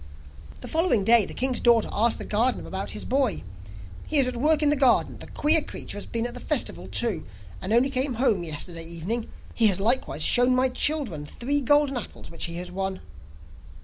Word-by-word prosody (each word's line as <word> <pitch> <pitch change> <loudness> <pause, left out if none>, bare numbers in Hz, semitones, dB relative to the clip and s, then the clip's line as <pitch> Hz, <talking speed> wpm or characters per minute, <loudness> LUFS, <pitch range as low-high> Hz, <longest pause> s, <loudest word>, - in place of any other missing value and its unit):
The - - -8
following 325 - +1
day 225 -1 +5
the - - -8
king's 260 -1 -1
daughter 235 -2 +3
asked 225 +3 +1
the - - -6
gardener 235 +5 -1
about 190 +1 -5
his - - -7
boy. 260 -6 -1 0.6
'He 310 - +4
is 270 -2 +5
at 255 - -3
work 305 +5 +1
in 295 - +3
the - - +3
garden; 265 -4 +1
the - - -10
queer 310 +2 +3
creature - - -7
has 205 - -7
been 230 0 -3
at 245 - -5
the - - -8
festival - - -2
too, 215 -10 -1 0.4
and 190 - -5
only 245 +4 +2
came 260 -1 0
home 220 -7 +1
yesterday 165 +1 -4
evening; 170 +8 -4 0.2
he 225 - +3
has 195 -3 +1
likewise 235 +6 +2
shown 245 +1 +5
my 260 +1 +2
children 255 - 0
three 285 - -2
golden 290 0 +2
apples 235 - -9
which 165 - -2
he 170 - -6
has 180 +1 -7
won. 190 0 -4
235 Hz, 205 wpm, -24 LUFS, 195-270 Hz, 0.6 s, day